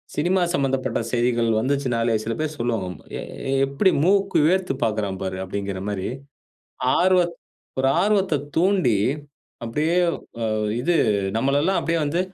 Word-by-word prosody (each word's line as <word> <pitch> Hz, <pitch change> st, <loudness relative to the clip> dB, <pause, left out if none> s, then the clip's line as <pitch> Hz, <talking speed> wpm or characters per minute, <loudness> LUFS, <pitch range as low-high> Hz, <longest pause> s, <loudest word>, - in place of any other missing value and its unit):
Cinema 180 Hz, +4 st, +1 dB
சம்மந்தப்பட்ட 135 Hz, -4 st, 0 dB
செய்திகள் 120 Hz, -1 st, +1 dB
வந்துச்சுன்னாலே 125 Hz, -3 st, 0 dB
சில 115 Hz, -, -2 dB
பேரு 155 Hz, -1 st, -1 dB
சொல்லுவாங்க, 110 Hz, -7 st, -2 dB, 0.2 s
"எ -, -, -4 dB, 0.5 s
எப்படி 160 Hz, +8 st, +2 dB
மூக்கு 195 Hz, 0 st, +3 dB
வேர்த்து 180 Hz, -4 st, +1 dB
பாக்குறான் 105 Hz, -4 st, -1 dB
பாரு." 95 Hz, -1 st, -3 dB
அப்படிங்கிற 100 Hz, 0 st, -4 dB
மாரி 95 Hz, -2 st, -3 dB, 0.9 s
ஆர்வத் 180 Hz, -2 st, +3 dB, 0.4 s
ஒரு 135 Hz, -, +3 dB
ஆர்வத்த 195 Hz, -8 st, +2 dB, 0.2 s
தூண்டி 180 Hz, -, +3 dB, 0.7 s
அப்படியே 150 Hz, +9 st, 0 dB, 0.5 s
அ -, -, 0 dB, 0.4 s
இது 175 Hz, +7 st, +1 dB, 0.4 s
நம்மளல்லாம் 145 Hz, +10 st, +2 dB
அப்படியே 165 Hz, 0 st, 0 dB
வந்து 165 Hz, +5 st, 0 dB
140 Hz, 120 wpm, -23 LUFS, 115-175 Hz, 0.9 s, மூக்கு